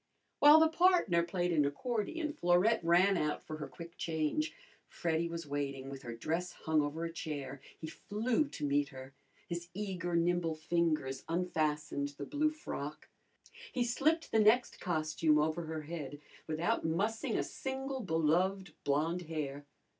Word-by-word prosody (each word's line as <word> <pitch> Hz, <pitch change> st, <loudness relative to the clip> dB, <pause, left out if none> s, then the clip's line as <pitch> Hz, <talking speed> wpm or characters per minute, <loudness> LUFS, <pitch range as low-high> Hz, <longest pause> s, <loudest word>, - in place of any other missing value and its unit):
While 295 Hz, +2 st, +9 dB
the 320 Hz, -, +6 dB
partner 330 Hz, -, +4 dB
played 175 Hz, 0 st, -1 dB
an 150 Hz, -3 st, +4 dB
accordion 245 Hz, -, -2 dB
Florette 180 Hz, -, +3 dB
ran 180 Hz, +3 st, +5 dB
out 150 Hz, -2 st, -1 dB
for 155 Hz, -, -6 dB
her 150 Hz, -2 st, -5 dB
quick 170 Hz, +5 st, -11 dB
change. 160 Hz, -, 0 dB, 0.4 s
Freddy 170 Hz, -1 st, -1 dB
was 165 Hz, -1 st, -5 dB
waiting, 140 Hz, -2 st, -3 dB
with 135 Hz, -1 st, -7 dB
her 120 Hz, -3 st, -6 dB
dress 165 Hz, +8 st, -2 dB
hung 160 Hz, -1 st, +1 dB
over 150 Hz, +3 st, -2 dB
a 165 Hz, -, -5 dB
chair. 140 Hz, -5 st, -5 dB, 0.2 s
He -, -, -7 dB
flew 225 Hz, -, -1 dB
to 215 Hz, -, -5 dB
meet 145 Hz, 0 st, +2 dB
her. 130 Hz, 0 st, -10 dB, 0.3 s
His 170 Hz, 0 st, -4 dB
eager, 185 Hz, -4 st, -2 dB
nimble 170 Hz, -1 st, +1 dB
fingers 155 Hz, -5 st, 0 dB
unfastened 150 Hz, -4 st, -1 dB
the 140 Hz, -, -5 dB
blue 300 Hz, -, +1 dB
frock. 155 Hz, -, -6 dB, 0.6 s
He 250 Hz, -, +1 dB
slipped 305 Hz, +7 st, +1 dB
the 220 Hz, -, +4 dB
next 220 Hz, +4 st, +4 dB
costume 155 Hz, -2 st, +1 dB
over 155 Hz, +2 st, 0 dB
her 160 Hz, -1 st, -4 dB
head 150 Hz, -2 st, -6 dB, 0.3 s
without 160 Hz, +2 st, 0 dB
mussing 200 Hz, +8 st, 0 dB
a -, -, +1 dB
single 265 Hz, 0 st, -4 dB
beloved 180 Hz, 0 st, +1 dB
blonde 155 Hz, +5 st, +1 dB
hair. 145 Hz, -3 st, -4 dB
170 Hz, 155 wpm, -33 LUFS, 150-200 Hz, 0.6 s, While